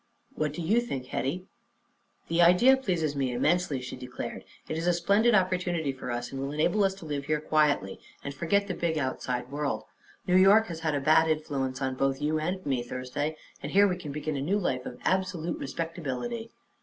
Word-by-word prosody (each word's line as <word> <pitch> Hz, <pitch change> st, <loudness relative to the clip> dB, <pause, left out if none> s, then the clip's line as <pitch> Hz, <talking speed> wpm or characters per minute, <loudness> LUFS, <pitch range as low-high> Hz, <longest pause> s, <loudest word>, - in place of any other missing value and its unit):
"What 150 Hz, -1 st, -1 dB
do 170 Hz, -, -5 dB
you 215 Hz, +9 st, +3 dB
think, 135 Hz, -, -4 dB
Hetty?" 150 Hz, +8 st, -3 dB, 0.8 s
"The 170 Hz, +1 st, +2 dB
idea 180 Hz, +10 st, +7 dB
pleases 175 Hz, -, -1 dB
me 135 Hz, -2 st, 0 dB
immensely," 145 Hz, +3 st, +1 dB
she 125 Hz, -, -6 dB
declared. 125 Hz, -1 st, -6 dB, 0.2 s
"It 155 Hz, -, -3 dB
is 165 Hz, +2 st, -2 dB
a 175 Hz, -, +4 dB
splendid 200 Hz, +7 st, +3 dB
opportunity 180 Hz, -5 st, +1 dB
for 130 Hz, -1 st, -7 dB
us, 120 Hz, 0 st, -3 dB
and 135 Hz, -, -4 dB
will 135 Hz, +1 st, -3 dB
enable 175 Hz, +7 st, +2 dB
us 190 Hz, -1 st, +1 dB
to 195 Hz, -, -11 dB
live 145 Hz, -2 st, -3 dB
here 155 Hz, 0 st, +1 dB
quietly 150 Hz, -10 st, +1 dB, 0.2 s
and 140 Hz, -, -5 dB
forget 200 Hz, +7 st, +1 dB
the 190 Hz, -, -2 dB
big 170 Hz, -2 st, -1 dB
outside 130 Hz, -2 st, -2 dB
world. 145 Hz, 0 st, -2 dB, 0.4 s
New 180 Hz, 0 st, +4 dB
York 200 Hz, +4 st, +6 dB
has 165 Hz, -1 st, -5 dB
had 160 Hz, -2 st, 0 dB
a -, -, +1 dB
bad 155 Hz, +3 st, +4 dB
influence 140 Hz, -4 st, -1 dB
on 130 Hz, 0 st, 0 dB
both 135 Hz, +1 st, 0 dB
you 155 Hz, +1 st, 0 dB
and 180 Hz, +4 st, -3 dB
me, 135 Hz, -4 st, 0 dB
Thursday, 130 Hz, +5 st, -4 dB, 0.2 s
and 145 Hz, -, -6 dB
here 200 Hz, +1 st, +6 dB
we 185 Hz, -, 0 dB
can 170 Hz, -5 st, -7 dB
begin 150 Hz, +1 st, -3 dB
a 135 Hz, -, -2 dB
new 185 Hz, +9 st, +1 dB
life 130 Hz, -10 st, -1 dB
of 125 Hz, -, -7 dB
absolute 185 Hz, -3 st, -1 dB
respectability." 165 Hz, -, -4 dB
155 Hz, 205 wpm, -28 LUFS, 135-180 Hz, 0.8 s, idea